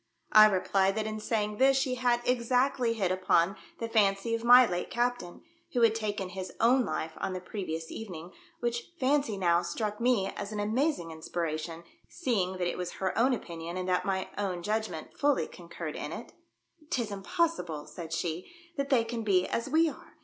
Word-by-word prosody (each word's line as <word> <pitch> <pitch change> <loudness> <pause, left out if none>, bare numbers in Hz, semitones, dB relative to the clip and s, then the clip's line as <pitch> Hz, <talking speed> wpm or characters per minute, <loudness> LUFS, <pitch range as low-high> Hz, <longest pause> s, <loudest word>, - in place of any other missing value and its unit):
I 215 0 +9
replied 195 0 +2
that 220 -1 -1
in 215 0 -3
saying 210 -1 -1
this 270 +2 +5
she 265 -1 +1
had 245 -1 +1
exactly 250 0 +2
hit 195 -5 0
upon 185 0 +2 0.2
the 230 - -3
fancy 210 -1 +2
of 230 0 -1
my 245 +1 +9
late 180 -4 -3
captain, 240 -7 -2 0.3
who 245 - +1
had 225 -1 +6
taken 205 -4 -3
his 185 0 -6
own 245 +2 +4
life 160 - -3
on 190 - -3
the 185 - -3
previous 170 -4 -5
evening, 180 -5 -7 0.3
which 240 0 -2
fancy 270 -5 +1
now 175 -2 +3
struck 210 +5 -3
me 235 -6 +2
as 200 - -5
an 210 - -4
amazing 215 - 0
inspiration, 160 0 -4 0.3
seeing 215 - 0
that 185 -1 -1
it - - -3
was 180 - -4
her 190 -1 -2
own 250 +4 +4
opinion 170 -6 -4
and 185 0 -3
that 180 0 +2
my 190 -1 -1
own 185 -4 -2
judgment 215 -5 -3
fully 290 -1 +3
concurred 170 -2 -7
in - - -5
it. - - -8 0.3
" 310 -2 -29
'Tis 240 -9 -1
impossible," 195 - -1
said 165 -3 -8
she, 165 - -3
" 335 0 -30
that 280 0 -1
they 250 -4 +4
can 230 0 -4
be 190 -4 +3
as 235 +4 -2
we 320 +3 +4
are. 310 - -8
210 Hz, 195 wpm, -30 LUFS, 180-240 Hz, 0.3 s, I